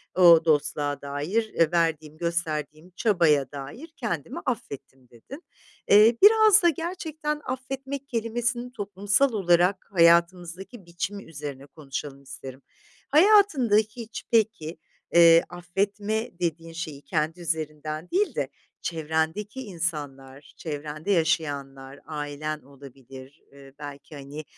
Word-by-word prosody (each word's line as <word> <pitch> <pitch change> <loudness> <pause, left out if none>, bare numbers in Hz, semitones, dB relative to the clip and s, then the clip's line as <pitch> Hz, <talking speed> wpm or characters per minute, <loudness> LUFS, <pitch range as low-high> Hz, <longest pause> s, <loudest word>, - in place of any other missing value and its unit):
o 175 -2 +8
dostluğa 145 -2 0
dair 165 +5 0
verdiğim, 160 -2 0
gösterdiğim 165 -1 -3
çabaya 165 - +2
dair 145 - -8
kendimi - - -4
affettim." 135 - -6
dedin. 190 - -12 0.4
Eee, 215 +3 +6
biraz 430 -1 +7
da 345 - +6
gerçekten 315 -2 -4
affetmek 265 +1 -5
kelimesinin 240 +1 -2
toplumsal 205 +3 0
olarak 180 -1 +2
hayatımızdaki 175 +4 +2
biçimi 175 +4 -5
üzerine 145 -3 -8
konuşalım 140 -1 -7
isterim. 135 0 -10 0.5
Hayatında 320 - +5
hiç 220 +1 -1
peki, 215 -8 +1 0.4
eee, 170 -1 +7
affetme 200 +5 -2
dediğin 165 -1 -3
şeyi 155 -4 -6
kendi 160 +2 -2
üzerinden 155 0 -4
değil 400 +3 +1
de - - -2 0.3
çevrendeki 160 +9 -2
insanlar, 145 - -5
çevrende 155 +3 -5
yaşayanlar, 140 -5 -1
ailen 150 0 -4
olabilir, 135 +1 -14
eee, 140 -1 -15
belki, 145 +1 -9
hani, 145 +2 -8
170 Hz, 105 wpm, -26 LUFS, 145-215 Hz, 0.5 s, o